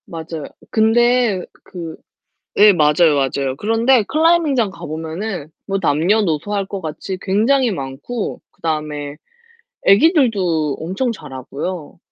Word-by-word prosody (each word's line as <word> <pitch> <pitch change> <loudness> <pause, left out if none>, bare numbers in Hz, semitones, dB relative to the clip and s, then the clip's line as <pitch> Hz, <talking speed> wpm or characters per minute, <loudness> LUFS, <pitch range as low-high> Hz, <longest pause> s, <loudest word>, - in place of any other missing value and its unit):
맞아요. 160 -2 -7 0.3
근데 230 -2 +3 0.2
그 170 -4 -8 0.6
예 210 0 +8
맞아요 155 -1 +4
맞아요. 135 -1 0
그런데 225 - +3
클라이밍 320 -1 +3
장 225 -5 +1
가보면은 160 +1 -5 0.2
뭐 195 0 0
남녀노소 175 +2 +1
할 200 -1 -1
것 195 -1 -5
같이 165 +4 -5
굉장히 230 +7 +2
많고, 150 - -5
그다음에 150 -2 -4 0.7
애기들도 195 - +3
엄청 190 +10 -2
잘하고요. 150 - -6
185 Hz, 265 characters per minute, -19 LUFS, 155-225 Hz, 0.7 s, 예